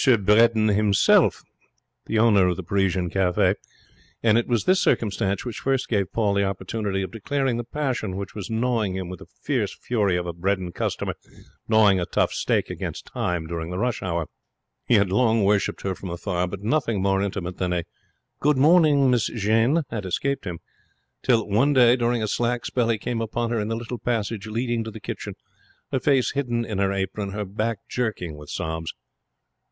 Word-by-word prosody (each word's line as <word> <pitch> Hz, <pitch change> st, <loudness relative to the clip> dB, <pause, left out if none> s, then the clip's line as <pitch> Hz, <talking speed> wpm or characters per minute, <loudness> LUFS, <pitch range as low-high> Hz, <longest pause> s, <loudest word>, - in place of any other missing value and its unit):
Bredin 110 Hz, +2 st, +4 dB
himself, 105 Hz, -1 st, +3 dB, 0.6 s
the 110 Hz, -, 0 dB
owner 105 Hz, -4 st, +5 dB
of 90 Hz, -, 0 dB
the 95 Hz, -, -5 dB
Parisian 95 Hz, -1 st, 0 dB
Cafe; 95 Hz, 0 st, +2 dB, 0.7 s
and 110 Hz, -2 st, +4 dB
it 120 Hz, -, +2 dB
was 120 Hz, -3 st, +1 dB
this 185 Hz, 0 st, +3 dB
circumstance 100 Hz, -2 st, 0 dB
which 120 Hz, -3 st, -5 dB
first 135 Hz, -1 st, 0 dB
gave 100 Hz, -4 st, 0 dB
Paul 105 Hz, -3 st, +1 dB
the 100 Hz, 0 st, +2 dB
opportunity 95 Hz, +1 st, -2 dB
of 95 Hz, -, -6 dB
declaring 130 Hz, +3 st, -1 dB
the 120 Hz, -, -3 dB
passion 125 Hz, -7 st, -3 dB
which 100 Hz, 0 st, -6 dB
was 100 Hz, -3 st, -6 dB
gnawing 115 Hz, -4 st, 0 dB
him 95 Hz, -2 st, -4 dB
with 90 Hz, -2 st, -7 dB
the -, -, -13 dB
fierce -, -, -2 dB
fury 105 Hz, -7 st, 0 dB
of 90 Hz, -, -3 dB
a 85 Hz, -, -4 dB
Bredin 95 Hz, +1 st, -1 dB
customer -, -, -2 dB, 0.5 s
gnawing 105 Hz, -4 st, +5 dB
a 85 Hz, -, -2 dB
tough -, -, +1 dB
steak -, -, 0 dB
against -, -, -5 dB
time 90 Hz, -2 st, -1 dB
during 80 Hz, 0 st, -4 dB
the 90 Hz, -, -4 dB
rush 120 Hz, +3 st, -1 dB
hour. 85 Hz, -3 st, -2 dB, 0.6 s
He 120 Hz, -, +4 dB
had 100 Hz, -3 st, +3 dB
long 115 Hz, 0 st, +3 dB
worshipped 100 Hz, 0 st, +1 dB
her 95 Hz, -, -1 dB
from 95 Hz, 0 st, -8 dB
afar, 90 Hz, +1 st, -2 dB
but 95 Hz, +1 st, -7 dB
nothing 115 Hz, -4 st, 0 dB
more 95 Hz, 0 st, +2 dB
intimate 95 Hz, -2 st, -3 dB
than 90 Hz, -1 st, 0 dB
a 90 Hz, -1 st, 0 dB, 0.6 s
'Good 150 Hz, -1 st, +2 dB
morning, 145 Hz, -3 st, +5 dB
Miss 120 Hz, -4 st, +2 dB
Jeanne', 115 Hz, +8 st, +2 dB
had 105 Hz, -5 st, -4 dB
escaped 135 Hz, +7 st, -1 dB
him, 85 Hz, -3 st, -5 dB, 0.6 s
till 115 Hz, -4 st, +2 dB
one 120 Hz, +8 st, +3 dB
day 125 Hz, -2 st, +6 dB
during 120 Hz, -2 st, 0 dB
a -, -, 0 dB
slack 120 Hz, +1 st, -1 dB
spell 120 Hz, -2 st, 0 dB
he 115 Hz, -, +2 dB
came 115 Hz, +2 st, -3 dB
upon 115 Hz, +1 st, -2 dB
her 115 Hz, -, 0 dB
in 105 Hz, -, -2 dB
the 115 Hz, -, -1 dB
little 120 Hz, +1 st, -5 dB
passage 110 Hz, -3 st, -2 dB
leading 115 Hz, +1 st, -1 dB
to 110 Hz, -, -6 dB
the 110 Hz, -, -9 dB
kitchen, -, -, -6 dB, 0.6 s
her 135 Hz, -, +1 dB
face 135 Hz, -1 st, +2 dB
hidden 120 Hz, -4 st, -1 dB
in 105 Hz, -4 st, -4 dB
her 100 Hz, 0 st, +2 dB
apron, 100 Hz, +1 st, -3 dB
her 105 Hz, 0 st, -3 dB
back 110 Hz, +2 st, -3 dB
jerking 105 Hz, -10 st, -3 dB
with 75 Hz, 0 st, -12 dB
sobs. 80 Hz, -2 st, -4 dB
105 Hz, 190 wpm, -24 LUFS, 95-120 Hz, 0.7 s, day